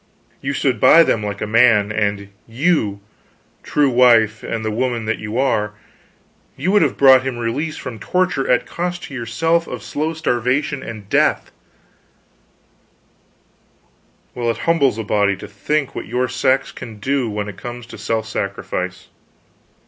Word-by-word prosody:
You 140 +1 -2
stood 130 -6 0
by 165 +9 +7
them 115 - +1
like 100 -1 -4
a - - 0
man; 110 -2 +4
and 100 -1 -1 0.2
you 115 - 0 0.6
true 145 -2 +1
wife 115 -3 +4
and 110 -1 -4
the 110 - -1
woman 120 0 -1
that 110 0 -1
you 105 +2 -5
are 105 -6 +1 0.8
you 170 +8 0
would 205 0 +4
have - - +1
bought 130 -2 +7
him 130 -2 -4
release 140 +7 -3
from 115 -4 -7
torture 180 - 0
at 125 - +2
cost 175 0 -4
to 145 - -9
yourself 165 +8 0
of - - -7
slow 155 +2 -3
starvation 140 -1 -1
and 110 -5 -8
death - - +1 2.8
well, 120 -1 -2
it 115 - -1
humbles 145 -9 +2
a 110 - -3
body 100 -1 +1
to 95 - -10
think 140 +7 -2
what - - -6
your 125 +2 0
sex 130 +2 +1
can 110 -2 -9
do 130 +2 -1
when 105 -1 -3
it 105 - -8
comes 120 -1 -7
to 120 - -11
self 110 -1 -2
sacrifice. 90 -3 -4
120 Hz, 155 wpm, -19 LUFS, 105-140 Hz, 2.8 s, by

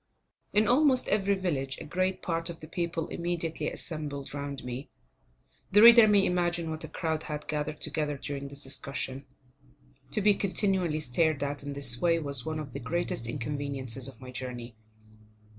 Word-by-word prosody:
In 210 +1 +3
almost 260 +1 +4
every 200 -1 +2
village, 140 -8 -2
a - - -6
great 185 +4 -1
part 165 0 0
of 170 - -7
the 155 - -10
people 170 -1 -2
immediately 165 -3 -2
assembled 145 -4 -5
round 140 -1 -5
me. 125 +3 -6 0.8
The 205 +2 +7
reader 235 -1 +10
may 205 -2 +5
imagine 175 -2 0
what 155 0 -4
a - - -4
crowd 160 -2 -2
had 150 -1 -6
gathered 150 0 -3
together 150 -2 0
during 140 0 -5
this 140 0 -6
discussion. 135 0 -3 0.8
To - - 0
be 205 +1 +5
continually 190 -5 +1
stared 155 +2 +1
at 145 0 -3
in 140 0 -5
this 130 -4 +4
way 170 -1 +4
was 140 -5 -1
one 160 0 -3
of 140 -5 -7
the 140 - -4
greatest 140 -3 -2
inconveniences 135 -1 -3
of 130 -4 -9
my 130 -1 -9
journey. 125 -2 -6
155 Hz, 170 wpm, -29 LUFS, 140-175 Hz, 0.8 s, reader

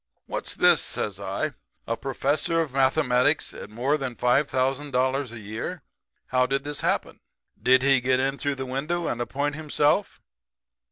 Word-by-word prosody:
"'What's - - -4
this,' - - +5
says - - -2
I. - - -3 0.3
'A 115 - -2
professor 145 +4 0
of 155 -5 -1
mathematics 135 +1 +2
at - - -9
more 125 +7 0
than 130 -3 -4
$5,000 130 0 +1
a 120 - -8
year? 105 +2 -6 0.5
How 130 0 +2
did 135 +1 0
this 145 0 -3
happen? - - -1 0.4
Did 130 +1 +4
he 135 -1 +4
get 130 +1 +2
in 135 +1 -1
through 145 -1 -1
the 130 0 -5
window 150 +7 -2
and 120 - -2
appoint 140 +5 -1
himself?' 150 +4 +1
135 Hz, 155 wpm, -25 LUFS, 125-145 Hz, 0.5 s, this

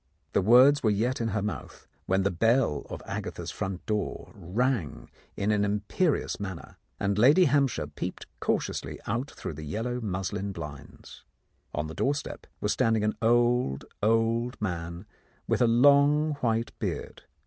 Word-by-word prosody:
The - - +3
words 125 +8 +6
were 110 - +2
yet 120 +5 0
in 115 - 0
her 105 -2 -1
mouth, 105 - -6 0.2
when 95 +1 +2
the 100 - +1
bell 115 - +1
of - - -7
Agatha's - - -5
front 95 -1 -5
door 105 -1 -3
rang 105 - -2 0.3
in 100 +2 +1
an 105 -1 +2
imperious 105 - 0
manner, 95 -4 -7 0.2
and 100 0 0
Lady 145 +10 +6
Hampshire 140 -5 +2
peeped - - -6
cautiously - - -2
out 130 +5 -2
through - - -6
the 75 - -8
yellow 115 +10 -3
muslin 95 -1 -3
blinds. 75 -5 -10 0.5
On 75 - -1
the 80 - -7
doorstep 140 - -2
was - - 0
stand 115 0 +2
ing 105 - -1
an 105 - 0
old, 120 - +2 0.2
old 115 +3 +1
man 85 -2 -4 0.4
with - - +1
a 120 - +5
long 145 +5 +5
white 115 -1 0
beard. - - -4
110 Hz, 155 wpm, -28 LUFS, 95-125 Hz, 0.5 s, words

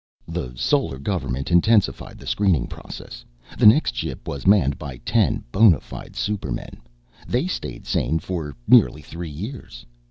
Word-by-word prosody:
The 80 -8 -5
Solar 65 +2 0
Government 70 -3 -3
intensified 100 +5 +2
the - - -13
screening 95 -6 +2
process. - - -10 0.4
The - - +7
next 140 +9 +5
ship - - -5
was 70 +3 -4
manned 80 -10 +4
by 70 -4 -7
ten - - +2
bona 95 - +6
fide - - -10
supermen. 100 -12 -4 0.5
They 125 +6 0
stayed 65 - -5
sane 75 +7 0
for 80 -4 -5
nearly 75 +5 +5
three 85 +3 -7
years. 90 - -8
80 Hz, 145 wpm, -23 LUFS, 70-100 Hz, 0.5 s, The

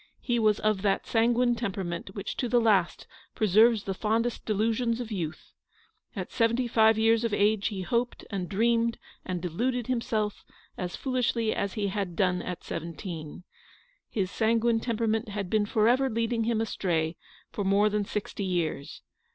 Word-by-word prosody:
He 240 -2 0
was 215 -2 +3
of 215 -3 +1
that 195 -1 +1
sanguine 240 +1 +2
tempei'ament 190 -5 -4
which 200 0 -4
to 245 - -1
the 245 - +4
last 205 -6 +2 0.3
preserves 215 +1 +4
the 195 - -2
fondest 225 +4 -1
delusions 225 +2 +1
of 235 -2 -5
youth. 175 -6 -5 0.6
At 185 -3 -5
so - - -12
seventy 235 +2 +2
five 220 -1 +4
years 225 +1 +3
of 225 -3 0
age 210 +1 +2
lie 190 -2 -4
hoped 235 +7 -1
and 185 -3 -3
dreamed 230 +2 +2 0.3
and 180 -1 -4
deluded 240 +8 -1
himself 220 -4 -1 0.3
as 180 -1 -4
foolishly 245 -4 0
as 200 - -2
he 205 -2 -1
had 190 -3 -3
done 180 -1 +1
at 180 -1 -6
seventeen. 165 0 -6 0.7
His 190 -3 -2
sanguine 230 +1 +2
temperament 225 -1 -1
had 200 -3 -4
been 215 -1 +2
for 215 +1 +2
ever 260 +3 +3
leading 230 0 0
him 230 -1 +1
astray 170 -7 -1 0.4
for 205 - -3
more 200 +2 +3
than 210 0 0
sixty 200 0 -4
years. 170 -6 -2
215 Hz, 165 wpm, -28 LUFS, 190-230 Hz, 0.7 s, the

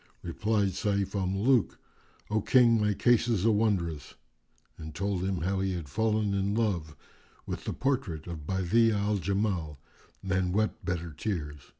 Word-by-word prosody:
Replied 105 +3 0
Sayf 100 0 -1
al 95 -3 -1
Muluk, 105 +4 +2 0.5
"O 110 0 +2
King, 115 -1 +4
my 105 -1 +1
case 120 +2 +3
is 110 -5 +1
a 115 - +5
wondrous," 95 -9 -1 0.6
and 80 -1 -9
told 100 -1 -1
him 95 -3 -1
how 95 +3 0
he 95 0 0
had 85 -4 -5
fallen 110 +4 0
in 100 +1 0
love 90 -9 -1 0.5
with - - -5
the - - -2
portrait 115 - -2
of 80 -4 -7
Badi'a 105 +4 +2
al 105 +1 0
Jamal, 95 -6 -1 0.5
and 95 -1 0
wept 110 0 0
bitter 85 -3 -3
tears. 75 -4 -5
100 Hz, 160 wpm, -29 LUFS, 85-110 Hz, 0.6 s, a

